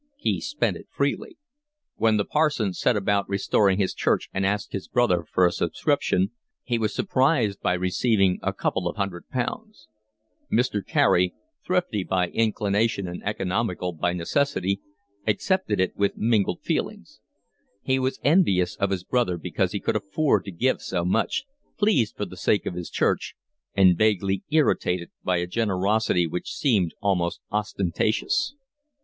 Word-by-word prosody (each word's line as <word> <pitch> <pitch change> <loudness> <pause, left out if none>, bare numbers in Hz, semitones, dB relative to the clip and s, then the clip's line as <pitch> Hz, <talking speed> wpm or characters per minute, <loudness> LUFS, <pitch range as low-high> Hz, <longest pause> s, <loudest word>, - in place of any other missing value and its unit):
He 290 - -1
spent 290 +3 -1
it - - -14
freely. 365 -6 -2 0.6
When 110 -1 +3
the 100 - 0
parson 150 -11 +1
set 120 - +1
about 100 -1 0
restoring 100 0 +2
his 100 -2 0
church - - 0
and 95 - -1
asked 105 +1 -2
his 95 - -4
brother 105 -9 +2
for 90 - +4
a 90 - +3
subscription, 150 - 0 0.3
he 120 -2 -1
was 110 -2 0
surprised 130 - +1
by - - +1
receiving 95 +1 +1
a - - 0
couple 90 - -1
of 85 - -3
hundred 100 -4 -4
pounds: 210 - -4 0.6
Mr. 110 -4 +1
Carey, 90 0 +2 0.3
thrifty 180 - 0
by 90 -1 0
inclination 105 -2 0
and 90 0 -6
economical 95 -2 -1
by 85 +2 0
necessity, 100 - 0 0.5
accepted 110 - 0
it 95 - 0
with 100 0 0
mingled 110 -3 +1
feelings; - - -3 0.6
he 130 0 +1
was 130 0 -1
envious 105 - +3
of 100 - 0
his 95 -2 -2
brother 120 -6 0
because 90 +2 -1
he 100 - -2
could - - -1
afford 105 +1 +1
to 100 - -6
give 125 +10 0
so 85 -2 -2
much, 110 - +1 0.3
pleased 205 - +2
for 105 - -2
the 95 - -10
sake 100 +3 +1
of - - -3
his 90 -1 -6
church, - - 0 0.4
and 95 -3 +5
vaguely 100 -3 +2
irritated 90 - +1
by 90 -1 +1
a 85 - -1
generosity 100 -1 +1
which 85 +2 -4
seemed 100 - +1
almost 90 -4 0
ostentatious. 105 - 0
100 Hz, 155 wpm, -25 LUFS, 90-120 Hz, 0.6 s, and